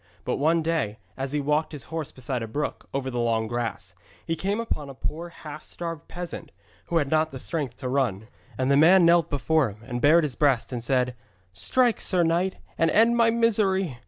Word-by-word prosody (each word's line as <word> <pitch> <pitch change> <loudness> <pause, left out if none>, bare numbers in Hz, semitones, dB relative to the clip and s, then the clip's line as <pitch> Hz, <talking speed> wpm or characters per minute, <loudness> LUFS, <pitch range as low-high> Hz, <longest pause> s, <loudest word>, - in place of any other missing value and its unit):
But - - -1
one 160 +3 +2
day, 155 -10 -1 0.2
as 135 0 -4
he 150 - 0
walked 150 +2 0
his 145 -4 -6
horse 160 -3 -3
beside 130 -1 -4
a 115 - -4
brook, 145 +7 -4
over 135 -1 -2
the 120 - -2
long 115 -1 +1
grass, 115 -5 -4 0.3
he 165 - -1
came 200 +6 -1
upon 150 -11 -3
a 135 - -9
poor 165 +6 -4
half 155 -2 -10
starved 165 -3 -7
peasant 175 -1 -7 0.3
who 170 - 0
had 145 -4 0
not 155 -4 +1
strength 140 -5 -3
to 130 - -5
run. 120 -6 0 0.3
And 130 +1 +1
the 140 - +5
man 175 +4 +7
knelt 170 -1 +4
before 145 -1 +2
him, 105 +2 -13
and 120 0 -4
bared 160 +3 +6
his 145 -4 -1
breast, 135 -3 +1
and 120 -2 -4
said, 125 0 +1 0.4
'Strike, 240 - +1
sir 180 -2 +2
knight, 175 +3 +1 0.2
and 165 - +4
end 230 +6 +4
my 230 -1 +4
misery!' 200 - +1
150 Hz, 205 wpm, -26 LUFS, 130-170 Hz, 0.4 s, man